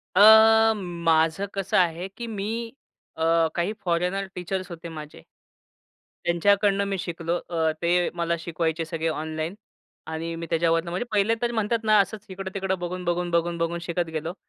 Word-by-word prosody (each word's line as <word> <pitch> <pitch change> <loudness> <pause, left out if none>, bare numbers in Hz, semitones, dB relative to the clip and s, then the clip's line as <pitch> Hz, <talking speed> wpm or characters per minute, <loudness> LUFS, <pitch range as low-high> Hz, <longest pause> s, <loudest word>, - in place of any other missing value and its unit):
अ, 220 +2 +8
माझं 170 -2 +1
कसं 195 -2 -1
आहे, 175 0 +1
की 235 +4 -8
मी 210 -1 -3 0.7
अ, 165 0 +3
काही 175 +4 0
फॉरेनर 180 +3 0
टीचर्स 185 +1 -4
होते 170 0 -8
माझे. 150 - -10 1.0
त्यांच्याकडनं 200 +3 +3
मी 200 -1 -2
शिकलो. 170 0 -2
अ, 160 -2 +1
ते 175 +1 +2
मला 170 -1 -1
शिकवायचे 165 -1 -2
सगळे 165 0 -3
ऑनलाईन. 160 +3 -4 0.5
आणि 165 +1 -4
मी 165 0 -5
त्याच्यावरनं 165 0 +1
म्हणजे 185 +8 -2
पहिले 210 +2 +2
तर 240 0 0
म्हणतात 225 0 -1
ना 215 -1 +5
असच 200 +2 -1
इकडं-तिकडं 190 0 -3
बघून, 180 +1 -4
बघून, 175 0 0
बघून, 170 0 +1
बघून 165 +1 -1
शिकत 175 0 -1
गेलो. 160 +2 -3
175 Hz, 155 wpm, -25 LUFS, 165-195 Hz, 1.0 s, अ